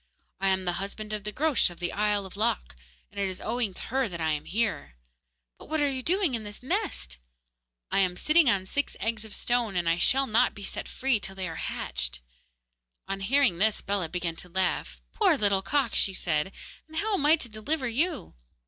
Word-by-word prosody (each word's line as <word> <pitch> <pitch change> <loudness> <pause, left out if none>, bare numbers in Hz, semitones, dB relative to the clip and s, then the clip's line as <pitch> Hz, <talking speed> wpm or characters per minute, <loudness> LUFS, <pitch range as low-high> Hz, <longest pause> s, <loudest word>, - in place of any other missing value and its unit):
'I 195 - +1
am 190 -1 +2
the 175 - +2
husband 210 +2 -5
of 210 -1 -4
the 210 - -2
Groac'h 290 -1 +2
of 175 - -12
the 175 -1 -2
isle 205 -1 +1
of 190 - -10
Lok, 205 - 0 0.4
and - - -7
it 195 -1 +1
is 185 - -6
owing 230 -1 -1
to - - -6
her 265 -4 +2
that 170 -2 -6
I 160 -1 +1
am 150 -1 -2
here.' 215 - -1 0.6
'But - - -12
what 315 0 0
are 290 -1 +2
you 260 -1 -3
doing 360 0 +2
in 225 -2 -2
this 205 +3 -7
nest?' 330 - -2 0.7
'I - - +3
am 180 -2 +2
sitting 305 - +5
on 195 -4 +2
six 285 +9 -2
eggs 225 -1 -1
of 215 - -9
stone, 240 -5 0
and 175 -1 0
I 165 +1 +2
shall 270 +7 +3
not 235 +1 +3
be 205 - -9
set - - -4
free 265 -4 +1
till 195 -1 -7
they 190 -1 -3
are 165 - -5
hatched.' - - -3 0.9
On 195 0 -3
hearing 230 -3 +3
this 215 +1 +3
Bellah 195 -4 -1
began 175 -1 -2
to 180 - -7
laugh. 170 - -1
'Poor - - +4
little 200 -2 +3
cock!' 270 +2 +1
she 195 - +2
said, 155 +1 0 0.4
'and 315 0 -9
how 425 +5 0
am 295 -7 +2
I 310 - +8
to 295 - -2
deliver 250 +6 -2
you? 295 +6 0
210 Hz, 220 wpm, -28 LUFS, 185-265 Hz, 0.9 s, I